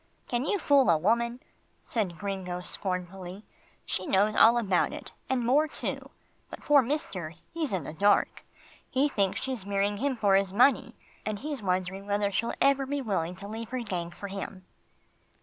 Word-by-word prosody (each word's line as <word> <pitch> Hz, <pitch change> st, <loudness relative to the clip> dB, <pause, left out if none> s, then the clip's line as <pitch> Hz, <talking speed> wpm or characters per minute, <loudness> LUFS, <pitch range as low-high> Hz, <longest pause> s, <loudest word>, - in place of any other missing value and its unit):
"Can 245 Hz, +2 st, -1 dB
you 405 Hz, -, +1 dB
fool 285 Hz, -, +4 dB
a 165 Hz, -, +5 dB
woman?" 235 Hz, +8 st, +1 dB, 0.4 s
said 195 Hz, -7 st, -2 dB
Gringo 185 Hz, -1 st, -4 dB
scornfully. 185 Hz, +1 st, -5 dB, 0.4 s
"She 185 Hz, -, -1 dB
knows 205 Hz, +2 st, +3 dB
all 235 Hz, +1 st, +7 dB
about 195 Hz, -6 st, +1 dB
it, -, -, -8 dB, 0.2 s
and 250 Hz, -3 st, 0 dB
more 290 Hz, +6 st, +4 dB
too -, -, -5 dB, 0.4 s
but -, -, -9 dB
poor 290 Hz, -1 st, +5 dB
mister, 215 Hz, -, -3 dB, 0.2 s
he's 325 Hz, -5 st, -2 dB
in 185 Hz, -5 st, -1 dB
the 150 Hz, -, -7 dB
dark. 205 Hz, +5 st, +2 dB, 0.5 s
He 270 Hz, +2 st, +2 dB
thinks 200 Hz, -9 st, 0 dB
she's 260 Hz, -6 st, -3 dB
marrying 200 Hz, +1 st, 0 dB
him 275 Hz, +4 st, 0 dB
for 205 Hz, -4 st, +2 dB
his 195 Hz, -1 st, +3 dB
money, 250 Hz, +6 st, +3 dB, 0.3 s
and 215 Hz, -1 st, -2 dB
he's 290 Hz, +1 st, -5 dB
wondering 185 Hz, +1 st, -2 dB
whether 205 Hz, 0 st, +1 dB
she'll 230 Hz, +4 st, -1 dB
ever 275 Hz, -1 st, +3 dB
be 285 Hz, +1 st, -1 dB
willing 180 Hz, -6 st, -1 dB
to 195 Hz, +2 st, -9 dB
leave 225 Hz, +1 st, -6 dB
her 255 Hz, +1 st, -3 dB
gang 180 Hz, -6 st, -3 dB
for 185 Hz, +4 st, -8 dB
him." 195 Hz, -1 st, -7 dB
205 Hz, 175 wpm, -28 LUFS, 185-255 Hz, 0.5 s, all